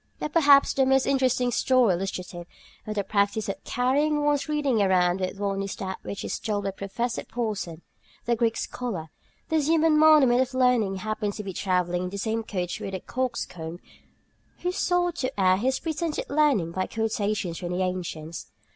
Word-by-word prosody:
But, 300 - -5
perhaps, 285 -4 +6
the 270 - +3
most 265 0 +3
interesting 255 -2 +2
story 250 -4 +3
illustrative 180 -1 -5 0.4
of 215 - -3
the 200 - 0
practice 200 +1 0
of 195 - -5
carrying 290 +4 +1
one's 295 +1 +1
reading 285 -7 +1
around 185 -2 +3
with 185 +1 -3
one 200 -1 -1
is 195 0 -4
that 190 -1 -5
which 200 - -6
is - - -3
told 205 -2 -2
of 195 -1 -3
Professor 230 +5 -3
Porson, 205 -8 -4 0.4
the 235 - +2
Greek 230 0 +1
scholar. 185 -11 -4 0.4
This 315 -3 +1
human 320 -1 +4
monument 295 -6 +6
of 255 0 -2
learning 250 -6 +3
happened 210 +1 -3
to 210 - -6
be 195 -2 -5
travelling 180 -1 0
in - - -3
the 200 - -6
same 220 +2 -1
coach 180 -5 -4
with 195 - -5
a - - -3
coxcomb 180 -11 -4 0.8
who 360 - 0
sought 355 -1 0
to 255 -6 -3
air 185 -1 +4
his 260 +6 0
pretended 325 0 -3
learning 280 - +2
by 185 +2 -2
quotations 210 -5 -2
from 175 - -5
the 180 +1 0
ancients. 170 -3 -4
215 Hz, 180 wpm, -26 LUFS, 190-265 Hz, 0.8 s, perhaps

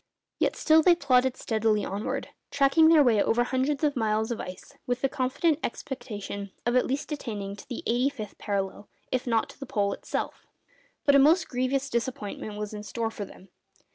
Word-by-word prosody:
Yet - - +1
still 315 0 +5
they 345 +2 +6
plodded 260 -5 +2
steadily 220 -2 +1
onwards, 200 +3 -3 0.2
tracking 280 +3 +4
their 320 -3 +7
way 225 -6 +4
over 240 +4 +2
hundreds 265 +4 -1
of 295 -2 +2
miles 220 -1 0
of 235 - -2
ice 185 0 -9
with 245 0 -1
the 270 - +3
confident 280 +4 +1
expectation 210 -6 -5 0.2
of 240 +1 +1
at 255 - +3
least 280 +4 -3
attaining 205 -9 -4
to - - -12
the 245 - -5
eighty 245 +4 +2
fifth 215 -8 -8
parallel, 200 0 -3 0.2
if 255 0 -1
not 230 -2 +2
to - - -14
the 275 - -7
Pole 200 -3 0
itself. - - -5 0.6
But 285 - +5
a - - +8
most 320 +5 +5
grievous 260 +2 0
disappointment 225 -4 -3
was 210 0 -4
in 210 - -5
store 225 +3 -3
for 205 - -5
them. 190 0 -15
245 Hz, 190 wpm, -27 LUFS, 210-275 Hz, 0.6 s, a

